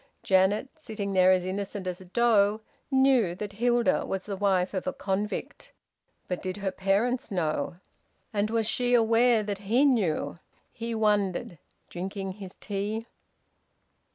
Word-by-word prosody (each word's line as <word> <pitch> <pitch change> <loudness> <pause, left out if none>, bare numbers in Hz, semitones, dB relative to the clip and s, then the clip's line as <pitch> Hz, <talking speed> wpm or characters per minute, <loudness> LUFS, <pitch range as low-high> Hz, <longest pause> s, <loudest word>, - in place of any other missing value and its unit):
Janet, 190 +5 +3
sitting 215 -9 -5
there 185 -1 +5
as 185 -1 +2
innocent 195 +1 -4
as 180 0 -4
a - - -11
doe, 215 0 +3 0.3
knew 265 -9 +3
that 200 +1 -6
Hilda 240 +2 +2
was 195 -1 -4
the 200 - -4
wife 190 -2 +1
of 190 - -3
a - - 0
convict. 200 +2 -4 0.6
But 180 - -3
did 185 +1 -4
her 195 -1 -2
parents 215 +8 0
know? 160 -5 -1 0.6
And 205 0 0
was 225 -1 0
she 245 +2 +2
aware 230 0 +4
that 205 -1 -4
he 230 +8 +2
knew? 195 - +1 0.3
He 230 0 -5
wondered, 205 -6 0 0.3
drinking 195 +2 -5
his 190 -1 -9
tea. 210 +3 -3
205 Hz, 145 wpm, -27 LUFS, 190-225 Hz, 0.6 s, there